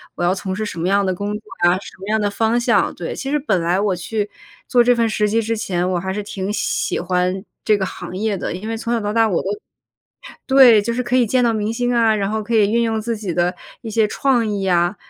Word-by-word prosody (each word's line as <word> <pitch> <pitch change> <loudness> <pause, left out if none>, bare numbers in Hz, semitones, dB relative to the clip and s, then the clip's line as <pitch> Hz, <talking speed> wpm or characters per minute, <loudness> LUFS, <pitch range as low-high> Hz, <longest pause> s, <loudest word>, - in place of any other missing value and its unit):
我 - - -3
要 175 +1 +3
从 190 -1 -4
事 215 +2 -3
什 190 - -6
么 175 - 0
样 200 +1 +2
的 185 - 0
工 200 +3 -4
作 210 - -3 0.3
呀？ 175 - +5
什 - - -11
么 195 - -6
样 220 0 +2
的 205 -1 0
方 225 +3 +1
向？” 240 - +2
对， - - -4
其 270 - -5
实 295 - +1
本 215 - 0
来 175 +3 +1
我 200 -2 +1
去 205 +4 -3 0.4
做 245 -1 +4
这 245 +1 +4
份 230 -1 +2
实 210 -1 +1
习 220 +2 +1
之 230 +1 -1
前， 180 -5 -1
我 180 - 0
还 190 +1 -3
是 205 +2 -3
挺 195 -1 -4
喜 210 - -1
欢 180 +2 -1 0.2
这 215 - +3
个 190 - -1
行 185 0 -7
业 215 0 0
的。 180 - -4
因 195 +4 -7
为 225 - -2
从 230 +1 -4
小 230 - +1
到 210 0 -3
大 225 -1 +3
我 180 - +1
都 190 - -3 1.0
对， 260 -5 +7
就 235 - -2
是 250 - -1
可 250 +1 0
以 245 -2 +4
见 250 +3 +2
到 235 - +3
明 215 -1 -1
星 245 +1 -1
啊， 225 -2 +3
然 200 -1 -1
后 220 0 -2
可 230 +3 -3
以 210 -2 +4
运 235 +1 +2
用 225 -1 0
自 230 +2 -2
己 200 -5 -4
的 175 +1 +1 0.3
一 225 - -6
些 220 0 +2
创 245 0 +1
意 205 -2 -2
呀， 175 0 +1
210 Hz, 295 characters per minute, -20 LUFS, 190-230 Hz, 1.0 s, 对